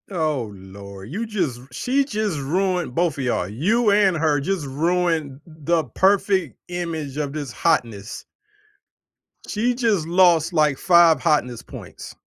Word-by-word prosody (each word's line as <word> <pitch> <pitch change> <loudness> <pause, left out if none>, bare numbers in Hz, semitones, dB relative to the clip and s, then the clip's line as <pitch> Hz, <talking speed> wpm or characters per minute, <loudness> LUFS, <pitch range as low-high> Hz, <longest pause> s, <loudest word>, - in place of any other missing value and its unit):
Oh 155 - -2
Lord, 100 +1 -11
you 220 +7 -3
just 170 - -2
she 260 - 0
just 215 - -2
ruined 175 0 -1
both 170 -4 0
of - - -2
y'all 120 -8 -1
you 205 - +1
and 200 -4 +3
her 155 -2 +1
just 180 0 -2
ruined 160 -1 -1
the 160 0 -1
perfect 190 - +1
image 165 -5 -4
of 145 -2 -3
this 145 -4 -5
hotness. 115 - -1 1.2
She 235 +4 0
just 225 -9 0
lost, 170 -1 +4
like, 150 -4 +2
5 170 -2 +5
hotness 125 -8 0
points. - - -11
165 Hz, 135 wpm, -22 LUFS, 140-185 Hz, 1.2 s, 5